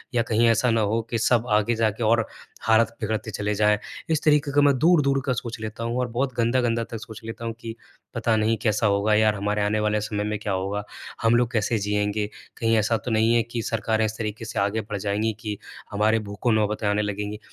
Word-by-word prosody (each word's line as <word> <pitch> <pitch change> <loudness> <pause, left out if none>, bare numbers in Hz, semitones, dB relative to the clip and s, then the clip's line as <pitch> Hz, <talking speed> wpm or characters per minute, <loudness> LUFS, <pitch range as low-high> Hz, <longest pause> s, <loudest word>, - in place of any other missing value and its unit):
या 115 - +4
कहीं 115 +1 +3
ऐसा 115 +2 +3
ना 115 -1 +2
हो 110 +2 +1
कि 115 - -1
सब 120 +1 +2
आगे 115 +3 0
जाके 110 0 0
और 115 +1 +3 0.4
हालत 110 +1 +3
बिगड़ते 110 0 -2
चले 105 +1 -2
जाए 105 0 +3 0.3
इस 155 - +1
तरीके 150 -1 +3
का 145 - +4
मैं 140 -2 +4
दूर-दूर 145 -4 +4
का 130 - +1
सोच 115 -1 -5
लेता 110 +1 -5
हूँ 115 +1 -2
और 125 - 0
बहुत 125 +2 -2
गंदा-गंदा 115 0 +1
तक 115 - -4
सोच 110 0 -10
लेता 115 +1 -6
हूँ, 115 - -2
कि 115 -1 -7 0.4
पता 115 -1 +1
नहीं 110 +1 +1
कैसा 110 -1 +2
होगा? 100 +1 +2
यार 110 0 +3
हमारे 105 +1 -1
आने 105 +1 +1
वाले 105 0 +1
समय 105 0 -2
में 105 0 -2
क्या 105 -2 -2
होगा? 100 +2 -2 0.4
हम 115 +1 +4
लोग 120 0 +2
कैसे 115 -1 +1
जिएँगे? 105 +1 -1 0.3
कहीं 115 0 +2
ऐसा 110 +2 +2
तो 120 - -2
नहीं 110 +1 +3
है 120 - +4
कि 115 +1 -4
सरकारें 110 0 0
इस 110 0 -4
तरीके 110 +1 -4
से 110 - -3
आगे 100 +3 0
बढ़ 105 0 -5
जाएँगी 105 +2 -1
कि, 105 -2 -4 0.3
हमारे 110 +2 +2
भूखों 100 +3 -2
नौबतें 105 0 0
आने 105 +1 +2
लगेंगी 105 0 -3
110 Hz, 225 wpm, -24 LUFS, 105-115 Hz, 0.4 s, या